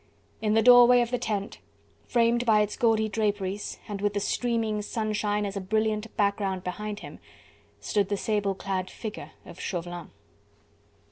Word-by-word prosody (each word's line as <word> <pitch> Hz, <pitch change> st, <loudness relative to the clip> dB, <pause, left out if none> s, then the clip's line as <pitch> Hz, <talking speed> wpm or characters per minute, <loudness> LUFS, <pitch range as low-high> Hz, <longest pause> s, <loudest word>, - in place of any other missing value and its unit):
In 215 Hz, -1 st, +1 dB
the 225 Hz, -, +4 dB
doorway 245 Hz, 0 st, +8 dB
of 240 Hz, 0 st, -2 dB
the 245 Hz, -, 0 dB
tent, 205 Hz, -2 st, -3 dB, 0.5 s
framed 235 Hz, 0 st, +2 dB
by 220 Hz, -3 st, +4 dB
its 210 Hz, 0 st, -1 dB
gaudy 220 Hz, -2 st, +2 dB
draperies, 205 Hz, -2 st, -2 dB
and 205 Hz, -2 st, -5 dB
with 205 Hz, 0 st, 0 dB
the -, -, +1 dB
streaming 225 Hz, -1 st, -1 dB
sunshine 210 Hz, -1 st, -1 dB
as 200 Hz, 0 st, -4 dB
a 200 Hz, -, -3 dB
brilliant 215 Hz, +2 st, -1 dB
background 200 Hz, -2 st, 0 dB
behind 205 Hz, +3 st, -5 dB
him, -, -, -10 dB, 0.6 s
stood 200 Hz, -2 st, 0 dB
the 205 Hz, -, 0 dB
sable 205 Hz, -2 st, 0 dB
clad 190 Hz, -1 st, -3 dB
figure 220 Hz, -2 st, -7 dB
of -, -, -12 dB
Chauvelin. 175 Hz, -2 st, -5 dB
210 Hz, 155 wpm, -27 LUFS, 200-220 Hz, 0.6 s, doorway